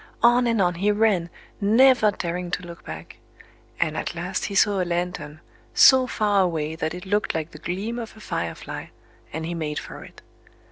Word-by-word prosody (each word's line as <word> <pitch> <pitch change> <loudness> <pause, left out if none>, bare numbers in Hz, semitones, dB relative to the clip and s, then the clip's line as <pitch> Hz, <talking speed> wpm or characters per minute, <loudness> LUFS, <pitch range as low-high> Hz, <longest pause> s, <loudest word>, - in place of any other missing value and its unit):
On 240 +1 +5
and 230 -2 +1
on 180 -2 +3
he 190 +5 0
ran, 205 -5 +2 0.3
never 230 +2 +5
daring 180 -2 -3
to 180 - -3
look 170 -1 -10
back; 80 +1 -9 0.6
and - - +1
at - - -3
last 180 +3 -3
he 200 - -4
saw 200 -1 +3
a - - +2
lantern, 170 -3 -3 0.3
so 260 -1 +7
far 205 -4 +2
away 160 -4 -1
that 160 0 -3
it 180 - -8
looked 205 -1 0
like 160 0 -3
the 155 - -11
gleam 200 +9 -3
of 225 -1 -8
a - - -12
firefly; 85 - -5 0.4
and 160 +1 -4
he 170 - -3
made 155 -3 -3
for - - -7
it. - - -15
180 Hz, 190 wpm, -24 LUFS, 165-210 Hz, 0.6 s, so